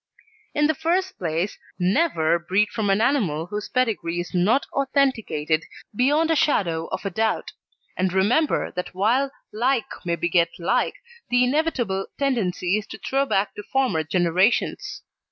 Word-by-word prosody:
In 295 Hz, -1 st, +3 dB
the 315 Hz, -, +3 dB
first 350 Hz, +5 st, -1 dB
place, 170 Hz, +3 st, -2 dB, 0.2 s
never 180 Hz, -, +2 dB
breed 190 Hz, +5 st, +1 dB
from 210 Hz, -2 st, -2 dB
an 195 Hz, +2 st, +3 dB
animal 205 Hz, -, +1 dB
whose 205 Hz, +3 st, -5 dB
pedigree 210 Hz, -9 st, 0 dB
is 175 Hz, -, -5 dB
not 195 Hz, +10 st, +2 dB
authenticated 225 Hz, -, +1 dB, 0.3 s
beyond 295 Hz, +7 st, +3 dB
a -, -, +3 dB
shadow 170 Hz, -, +1 dB
of -, -, -5 dB
a 195 Hz, -, -1 dB
doubt; 220 Hz, +4 st, -1 dB, 0.4 s
and 185 Hz, 0 st, 0 dB
remember 215 Hz, -, +2 dB
that 180 Hz, 0 st, -5 dB
while 240 Hz, +8 st, +2 dB, 0.2 s
like 245 Hz, +2 st, +1 dB, 0.2 s
may 170 Hz, -2 st, 0 dB
beget 170 Hz, 0 st, +2 dB
like, 170 Hz, -, 0 dB, 0.3 s
the 245 Hz, 0 st, +4 dB
inevitable 250 Hz, -8 st, 0 dB
tendency 210 Hz, -8 st, 0 dB
is 210 Hz, -, -10 dB
to -, -, -8 dB
throw 275 Hz, +1 st, 0 dB
back 200 Hz, -4 st, 0 dB
to -, -, -7 dB
former 255 Hz, -12 st, +2 dB
generations. 185 Hz, -, +1 dB
210 Hz, 150 wpm, -23 LUFS, 175-270 Hz, 0.4 s, the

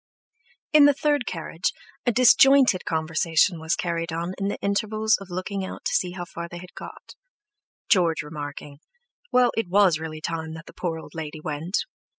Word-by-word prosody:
In 300 Hz, -1 st, +8 dB
the 290 Hz, -1 st, +5 dB
third 290 Hz, -3 st, 0 dB
carriage 165 Hz, 0 st, -3 dB, 0.3 s
a -, -, +5 dB
disjointed 255 Hz, -2 st, +5 dB
conversation 160 Hz, +2 st, +1 dB
was 160 Hz, +1 st, 0 dB
carried 170 Hz, -1 st, -2 dB
on 170 Hz, +2 st, -3 dB
in 195 Hz, -, -1 dB
the 200 Hz, -, -2 dB
intervals 215 Hz, +2 st, +1 dB
of 195 Hz, -, -10 dB
looking 185 Hz, +2 st, -4 dB
out 190 Hz, -, -8 dB
to -, -, 0 dB
see 180 Hz, -2 st, 0 dB
how 175 Hz, -1 st, -5 dB
far 170 Hz, 0 st, -7 dB
they 175 Hz, -, -8 dB
had 180 Hz, +1 st, -11 dB
got, -, -, -11 dB, 0.7 s
George 165 Hz, -7 st, +3 dB
remarking, 145 Hz, -1 st, -8 dB, 0.5 s
"Well, 250 Hz, -1 st, +4 dB
it 225 Hz, -5 st, -1 dB
was 185 Hz, -4 st, +4 dB
really 155 Hz, -1 st, -6 dB
time 160 Hz, 0 st, -4 dB
that 165 Hz, +1 st, -10 dB
the -, -, -13 dB
poor 170 Hz, -3 st, -3 dB
old 160 Hz, -, -11 dB
lady 155 Hz, -1 st, -6 dB
went." 155 Hz, +5 st, -3 dB
175 Hz, 175 wpm, -24 LUFS, 160-205 Hz, 0.7 s, In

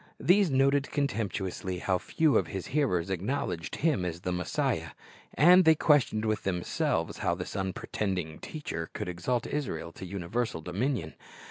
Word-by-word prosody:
These 190 Hz, +1 st, +4 dB
noted 140 Hz, +1 st, +3 dB
contemptuously 100 Hz, -8 st, -2 dB
how 90 Hz, 0 st, 0 dB
few 155 Hz, -, +2 dB
of -, -, +3 dB
His 95 Hz, -2 st, -5 dB
hearers 95 Hz, -, +1 dB
acknowledged 95 Hz, -3 st, -2 dB
Him 150 Hz, -, +1 dB
as 85 Hz, -1 st, -4 dB
the 90 Hz, -, -2 dB
Messiah. 90 Hz, -1 st, -1 dB, 0.4 s
And 180 Hz, +4 st, +7 dB
they 160 Hz, -1 st, +6 dB
questioned 140 Hz, -8 st, +3 dB
with 110 Hz, -1 st, 0 dB
themselves 90 Hz, -2 st, -1 dB
how 85 Hz, -, +1 dB
this 90 Hz, +2 st, -6 dB
unpretending 95 Hz, -3 st, -3 dB
teacher 110 Hz, -, -5 dB
could 105 Hz, -, -4 dB
exalt 100 Hz, +8 st, -1 dB
Israel 85 Hz, -, -3 dB
to 95 Hz, -, -9 dB
universal 100 Hz, +1 st, -2 dB
dominion. 95 Hz, -, -2 dB
100 Hz, 145 wpm, -29 LUFS, 90-140 Hz, 0.4 s, And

